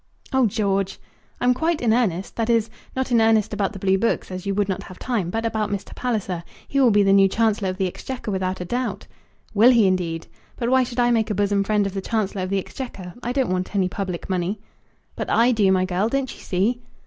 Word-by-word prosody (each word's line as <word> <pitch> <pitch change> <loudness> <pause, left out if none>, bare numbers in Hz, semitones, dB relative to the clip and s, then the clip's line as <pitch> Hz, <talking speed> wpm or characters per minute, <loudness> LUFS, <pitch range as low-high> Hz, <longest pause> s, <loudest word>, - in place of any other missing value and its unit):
"Oh, 265 -3 +4
George!" 195 -2 -1 0.4
"I'm 250 0 +3
quite 320 +5 0
in 230 -3 +2
earnest. 195 -6 0
That 225 0 -1
is, 230 -1 +2 0.2
not 260 -1 -2
in 235 -2 +5
earnest 220 -2 +3
about 200 -2 0
the 205 - -8
blue 190 0 +2
books, 230 -3 0
as 185 +1 -6
you 195 - 0
would 205 -1 +1
not 190 - -2
have 185 - -11
time; 225 -9 -2
but 225 +4 -2
about 220 -2 -1
Mr. 200 -1 -4
Palliser. 200 -8 -2 0.2
He 275 - 0
will 260 -3 +6
be 205 -1 +4
the 195 0 +4
new 195 0 +6
Chancellor 210 -1 +1
of 185 - -4
the 195 - 0
Exchequer 235 +5 -5
without 185 -1 -2
a 180 - -4
doubt." 245 +6 -3 0.5
"Will 220 +4 +6
he 235 -4 +5
indeed? 175 -3 0 0.3
But 235 -1 -2
why 260 0 +5
should 245 0 -5
I 240 0 +4
make 225 -2 +2
a 210 - -1
bosom 200 0 +2
friend 210 0 +1
of 195 - -3
the 195 - -3
Chancellor 205 -2 -1
of 185 - -3
the 195 - +1
Exchequer. 190 -3 -6
I 240 - -2
don't 260 -5 0
want 185 +2 -2
any 185 -2 +2
public 185 -3 -4
money." 185 +2 -1 0.6
"But - - -4
I 235 +2 +4
do, 205 -5 +3
my 185 -1 +3
girl. 185 +4 0
Don't 270 0 -1
you - - -15
see?" 215 +7 0
205 Hz, 240 wpm, -23 LUFS, 190-235 Hz, 0.6 s, will